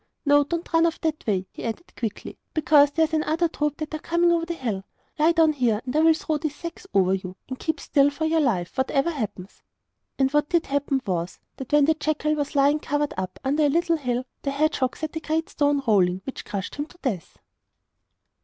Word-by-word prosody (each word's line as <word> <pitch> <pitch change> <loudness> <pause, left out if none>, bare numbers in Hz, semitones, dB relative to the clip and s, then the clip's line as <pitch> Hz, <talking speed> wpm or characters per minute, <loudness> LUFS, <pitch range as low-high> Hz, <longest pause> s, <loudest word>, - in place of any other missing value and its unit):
No; 290 0 +5
don't 335 +4 -4
run 330 0 +5
off 330 - -3
that 310 -5 -2
way,' 190 -3 +1
he - - -9
added 235 - -5
quickly, 225 -4 -5 0.2
'because 300 -2 +5
there 320 +3 +1
is 320 +1 -1
another 315 +2 +1
troop 300 -2 -2
that 310 0 -5
are 310 - -2
coming 340 +2 +2
over 335 -1 +1
the 340 - -3
hill. 220 -10 -3 0.4
Lie 315 +2 +5
down 325 -2 +4
here, 240 -7 +1
and 255 +2 -4
I - - +4
will 320 0 +5
throw 320 -3 -2
these 295 -1 -3
sacks 335 +2 -8
over 190 -1 +3
you; 185 -1 -4
and 260 -1 -6
keep 320 - -2
still 280 -1 +3
for 300 +3 -3
your 320 +1 +2
life, 200 - 0
whatever 275 +4 +1
happens.' 210 - -6 0.6
And 270 -1 +2
what 295 0 +1
did 340 -2 +2
happen 280 -1 -1
was, 175 -3 -2 0.2
that 265 - -8
when 295 -1 +5
the 320 - +4
jackal 305 0 -1
was 290 -1 -3
lying 285 +2 +4
covered 290 0 -1
up, 185 0 -5
under 285 +3 +1
a - - +3
little 335 +2 +2
hill, 250 -3 -2 0.2
the 280 - -2
hedgehog 280 -2 0
set 315 +1 -5
a - - -1
great 320 +1 -2
stone 285 -1 +1
rolling, 185 -5 +3
which 270 - -7
crushed 200 -2 -4
him 290 +1 -3
to 355 - -19
death. 205 - -3
290 Hz, 220 wpm, -24 LUFS, 255-315 Hz, 0.6 s, No